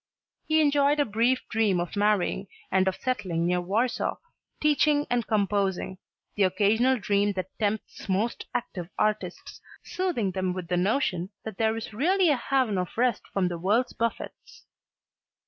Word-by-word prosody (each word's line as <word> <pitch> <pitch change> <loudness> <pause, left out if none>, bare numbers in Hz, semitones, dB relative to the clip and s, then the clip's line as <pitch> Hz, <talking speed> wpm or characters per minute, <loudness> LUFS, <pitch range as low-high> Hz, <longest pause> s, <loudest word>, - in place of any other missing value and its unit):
He 315 0 +4
enjoyed 290 0 +3
a 290 - +4
brief 235 +4 +1
dream 210 -5 +1
of 175 +2 -4
marrying 205 -1 +1 0.2
and 190 0 +3
of 190 - +1
settling 185 -10 -1
near 180 0 +1
Warsaw, 220 +8 0 0.4
teaching 300 0 +3
and 240 -2 +1
composing 200 -3 0 0.3
the 205 - -3
occasional 210 +7 +3
dream 205 -1 +1
that 185 -1 -5
tempts 210 -1 -3
most 205 +5 -1
active 180 -7 -4
artists, 215 0 -2 0.2
soothing 340 - -1
them 185 -1 -1
with 180 -2 -6
the 180 - +1
notion 190 -2 0 0.2
that 220 -3 -7
there 220 0 +2
is 225 -1 -6
really 355 - +3
a 290 - +4
haven 250 -5 0
of 180 +3 -5
rest 245 -2 +2
from 190 -2 +1
the 175 -1 -4
world's 210 +8 +1
buffets. 230 0 -5
210 Hz, 155 wpm, -27 LUFS, 190-250 Hz, 0.4 s, He